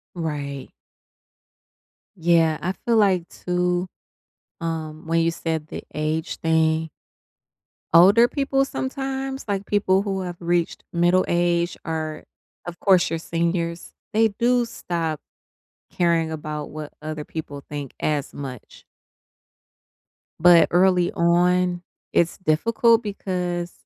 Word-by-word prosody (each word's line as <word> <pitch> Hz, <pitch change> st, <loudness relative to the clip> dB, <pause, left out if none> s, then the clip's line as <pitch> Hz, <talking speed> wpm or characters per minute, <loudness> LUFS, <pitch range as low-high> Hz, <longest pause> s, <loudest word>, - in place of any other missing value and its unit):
Right. 145 Hz, -5 st, -4 dB, 1.5 s
Yeah, 165 Hz, -2 st, +3 dB
I 185 Hz, -, -1 dB
feel 230 Hz, +5 st, -1 dB
like 190 Hz, -5 st, +3 dB
too, 180 Hz, 0 st, -1 dB, 0.7 s
um, 160 Hz, -1 st, -4 dB
when 165 Hz, 0 st, +2 dB
you 165 Hz, 0 st, +2 dB
said 160 Hz, -2 st, -3 dB
the -, -, -7 dB
age 155 Hz, +2 st, -2 dB
thing 160 Hz, 0 st, +1 dB, 1.1 s
older 200 Hz, +8 st, +7 dB
people 275 Hz, -1 st, 0 dB
sometimes, 270 Hz, 0 st, -4 dB
like 200 Hz, -1 st, -1 dB
people 195 Hz, -2 st, +2 dB
who 195 Hz, -2 st, -2 dB
have 180 Hz, -1 st, -5 dB
reached 170 Hz, 0 st, -1 dB
middle 175 Hz, +2 st, +3 dB
age 175 Hz, 0 st, +1 dB
or, 155 Hz, -1 st, -4 dB, 0.4 s
of 175 Hz, -1 st, -7 dB
course, 190 Hz, -3 st, +4 dB
your 165 Hz, 0 st, -2 dB
seniors, 170 Hz, 0 st, -2 dB, 0.2 s
they 225 Hz, +1 st, +4 dB
do 240 Hz, +3 st, +1 dB
stop 165 Hz, -8 st, -3 dB, 0.7 s
caring 165 Hz, -2 st, +1 dB
about 150 Hz, -1 st, -5 dB
what 150 Hz, -1 st, -8 dB
other 155 Hz, -1 st, -5 dB
people 145 Hz, -3 st, -7 dB
think 145 Hz, -3 st, -6 dB
as 150 Hz, -2 st, -1 dB
much. 130 Hz, -5 st, -9 dB, 1.6 s
But 175 Hz, 0 st, +7 dB
early 180 Hz, 0 st, +3 dB
on, 175 Hz, +1 st, +2 dB, 0.3 s
it's 170 Hz, -1 st, +1 dB
difficult, 225 Hz, +7 st, +3 dB
because 180 Hz, -4 st, -3 dB
170 Hz, 115 wpm, -23 LUFS, 160-190 Hz, 1.6 s, older